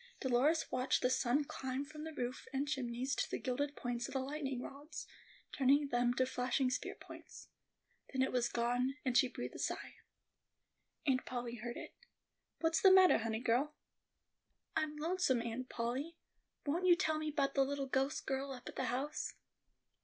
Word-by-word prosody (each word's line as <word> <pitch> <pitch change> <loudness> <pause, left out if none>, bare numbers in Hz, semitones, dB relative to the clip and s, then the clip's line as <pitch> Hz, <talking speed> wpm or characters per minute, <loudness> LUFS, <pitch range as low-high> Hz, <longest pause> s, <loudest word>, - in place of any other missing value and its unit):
Dolores 270 +6 +2
watched 255 0 +1
the 250 - +3
sun 255 +3 +2
climb 265 0 -3
from 300 +1 -8
the 320 - -5
roof 250 -3 -4
and 280 +1 -1
chimneys 260 -1 -1
to - - 0
the - - -1
gilded 285 +2 -2
points 240 -1 -2
of - - -8
the - - +2
lightning 270 -1 -3
rods, 280 +5 -7 0.5
turning 280 +1 +3
them 245 -1 +3
to 255 - +3
flashing 255 0 0
spear - - -2
points. - - -12 0.6
Then 265 -1 +2
it 265 - 0
was 240 -1 +1
gone; 245 +3 +1
and 255 -2 +1
she 260 - +6
breathed 250 - -6
a - - -8
sigh. - - -3 1.1
Aunt 260 -3 +2
Polly 240 -1 -3
heard 240 +2 -5
it. - - -8 0.7
"What's 325 0 +2
the 385 - +8
mattah, 375 -1 +7
honey 225 0 -2
girl?" 255 +5 +1 1.0
"I'm 300 -1 0
lonesome, 310 -6 +1
Aunt 235 +2 -4
Polly; 260 +8 -3 0.5
won't 340 +6 +1
you 350 - +8
tell 315 -3 +1
me 310 0 -2
'bout 280 -2 +1
the 275 - +4
little 280 0 -2
ghost 270 +3 0
girl 270 +1 -2
up 245 -2 -10
at - - -7
the 260 - 0
house?" 265 +5 -2
265 Hz, 175 wpm, -36 LUFS, 245-295 Hz, 1.1 s, the